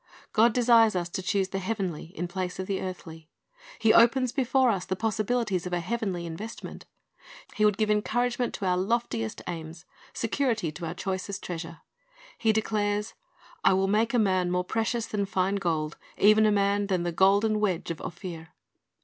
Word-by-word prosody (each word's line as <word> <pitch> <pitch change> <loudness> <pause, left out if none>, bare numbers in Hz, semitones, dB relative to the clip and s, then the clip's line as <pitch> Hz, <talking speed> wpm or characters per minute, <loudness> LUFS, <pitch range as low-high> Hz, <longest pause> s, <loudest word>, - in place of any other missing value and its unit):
"' - - -29
God 230 +2 +5
desires 230 -2 +5
us 175 -1 -1
to 190 - -4
choose 190 0 0
the 195 - -3
heavenly 190 -5 -3
in 175 +2 -2
place 180 0 -4
of 190 - -3
the 195 0 -2
earthly. 165 -4 -8 0.5
He 220 -1 +4
opens 240 +2 +5
before 260 -1 +2
us 190 -4 -2
the 190 - -2
possibilities 215 -2 -1
of 180 - -6
a 175 - +1
heavenly 190 -2 -3
investment. 200 +8 -8 0.7
He 215 - +2
would 210 -2 +3
give 215 -1 +1
encouragement 240 +3 0
to 195 - -4
our 180 -1 +2
loftiest 190 - -1
aims, 165 -1 -7 0.3
security 230 - -1
to 170 +1 -6
our 165 - -5
choicest 190 +1 -4
treasure. 165 -2 -6 0.6
He 225 - +3
declares, 210 -1 -1 0.5
"I - - +5
will 190 +1 +2
make 220 +4 +1
a - - +4
man 185 -5 +2
more 180 0 0
precious 225 +4 -1
than 200 -2 -2
fine 190 +1 0
gold; 160 -4 -2 0.2
even 215 +1 +5
a - - +3
man 200 0 +1
than 185 -3 0
the 175 - -1
golden 200 +5 +3
wedge 185 -6 -1
of 165 - -6
Ophir." 170 -2 -8
195 Hz, 180 wpm, -27 LUFS, 180-220 Hz, 0.7 s, God